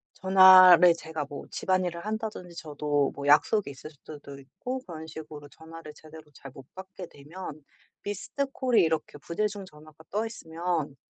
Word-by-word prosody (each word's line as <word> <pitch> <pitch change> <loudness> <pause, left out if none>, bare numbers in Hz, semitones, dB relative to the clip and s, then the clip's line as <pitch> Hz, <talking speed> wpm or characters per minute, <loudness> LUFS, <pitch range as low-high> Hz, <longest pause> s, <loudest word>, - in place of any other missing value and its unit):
전화를 185 -2 +7
제가 160 -2 -6
뭐 145 - -8
집안일을 180 -2 -2
한다든지 215 -5 -5
저도 145 -3 -1
뭐 140 0 -6
약속이 155 +5 +3
있을 140 +3 -12
수도 145 -1 -12
있고 190 - -7
그런 160 -3 -8
식으로 150 -2 -10
전화를 160 0 -12
제대로 155 +1 -14
잘 135 - -12
못 135 - -12
받게 190 0 -10
되면 155 +1 -11 0.4
missed 205 -1 -7 0.2
call이 255 -3 +3
이렇게 160 -2 -2
부재중 200 +5 -4
전화가 155 -1 -17
떠 215 +3 -2
있으면 165 -7 -4
165 Hz, 360 characters per minute, -27 LUFS, 150-190 Hz, 0.4 s, 전화를